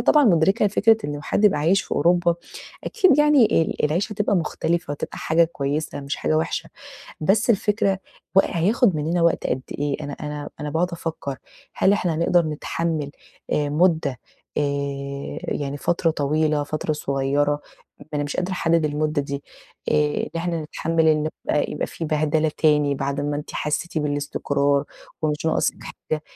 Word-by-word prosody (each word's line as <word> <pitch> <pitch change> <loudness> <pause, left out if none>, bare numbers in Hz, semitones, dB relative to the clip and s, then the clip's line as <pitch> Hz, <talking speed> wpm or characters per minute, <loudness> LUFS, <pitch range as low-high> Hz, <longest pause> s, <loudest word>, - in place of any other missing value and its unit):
طبعًا 300 -1 +5
مُدركة 195 +1 +4
لفكرة 220 +2 +4
إن 145 0 -4
حد 205 - 0
يبقى 205 -7 +5
عايش 170 +7 +3
في - - -9
أوروبا 175 0 +3 0.5
أكيد 375 - +3
يعني 295 - +5
ال 160 - -2
العيشة 175 +8 0
هتبقى 205 -1 +1
مختلفة 170 -1 -1
وهتبقى 145 - -5
حاجة 165 +1 +3
كويسة 145 -2 -3
مش 140 0 -4
حاجة 155 - 0
وِحشة، 160 - -2 0.5
بس 200 +9 +3
الفكرة 205 -2 +2 0.4
و - - +10
هياخد 195 +2 +2
منّنا 165 +3 0
وقت 170 0 +2
قد 130 +1 -1 0.2
إيه؟ 145 -1 0
أنا 145 - -5
أنا 150 0 -5
-أنا 150 - -3
باقعد 175 +3 0
أفكّر 160 -5 -4 0.4
هل 190 - +3
إحنا 180 -6 0
نقدر 170 +1 +3
نتحمِّل 155 0 -2 0.4
آآ 150 -1 +1
مُدّة 155 -4 +2 0.4
آآ - - +2 0.9
يعني 140 0 -2
فترة 170 +3 +1
طويلة، 150 0 +1
فترة 155 +1 -2
صغيرة، 145 +1 0 0.5
أنا 145 - 0
مش 145 - -4
قادرة 180 +1 -1
أحدّد 165 -2 +2
المُدّة 150 0 0
دي، 140 0 -5 0.5
آآ - - +3 0.3
إن - - -3
نحن 170 +1 -1
نتحمِّل 160 +1 0
ال 155 0 +2 0.2
يبقى 150 - +1
يبقى - - -2
في 165 - -6
بهدلة 155 0 +1
تاني 150 -2 +3
بعد 140 +1 -2
ما 145 0 -1
أنتِ 150 - -6
حسّيتِ 160 +2 -2
بالإستقرار 145 -1 0 0.4
ومش 150 0 -1
ناقصِك 160 - +1
حاجة، 155 -1 -5
155 Hz, 160 wpm, -23 LUFS, 145-175 Hz, 0.9 s, و